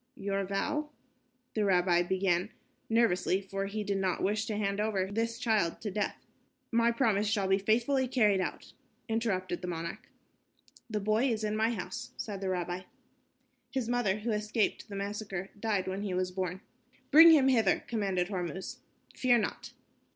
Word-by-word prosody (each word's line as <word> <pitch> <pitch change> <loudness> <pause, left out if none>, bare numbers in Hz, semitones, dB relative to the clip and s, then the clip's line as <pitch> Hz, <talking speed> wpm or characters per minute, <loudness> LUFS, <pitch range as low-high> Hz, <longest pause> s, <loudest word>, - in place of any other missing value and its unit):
"Your 195 0 -2
vow...." 295 +10 -2 0.6
the 215 - 0
rabbi 180 -3 +3
began, 185 +1 +1 0.4
nervously, 225 -5 +2
for 195 0 -4
he 210 +1 -3
did 200 -1 -1
not 185 -2 -1
wish 210 +3 0
to 215 - -2
hand 200 -1 -1
over 210 -3 0
this 230 +4 -2
child 220 -8 +1
to 210 - -3
death. 205 +2 -3 0.5
"My 235 0 +3
promise 220 -4 +1
shall 205 -2 +1
be 195 +1 +3
faithfully 240 +6 +2
carried 210 -6 +3
out," - - -5 0.3
interrupted 200 -6 -1
the 180 - -5
monarch. 170 -1 -5 0.8
"The 210 -2 -2
boy 215 +6 +2
is 220 -2 -1
in 215 0 -1
my 220 +1 +2
house," 185 -5 -5
said 200 -3 -5
the 190 - -1
rabbi. 180 0 -2 0.9
"His 260 -4 -2
mother, 235 -4 0
who 235 +2 -1
escaped 215 +1 -1
the 200 - -6
massacre, 200 -1 -4
died 205 -4 0
when 190 +1 -3
he 195 -3 -2
was 185 0 -1
born." 185 0 -3 0.5
"Bring 325 +3 +10
him 295 -5 +6
hither," 225 -7 +3
commanded 195 -5 -1
Hormuz. 185 -1 -4 0.4
"Fear 245 -2 +4
not." 215 - -3
205 Hz, 165 wpm, -31 LUFS, 190-225 Hz, 0.9 s, Bring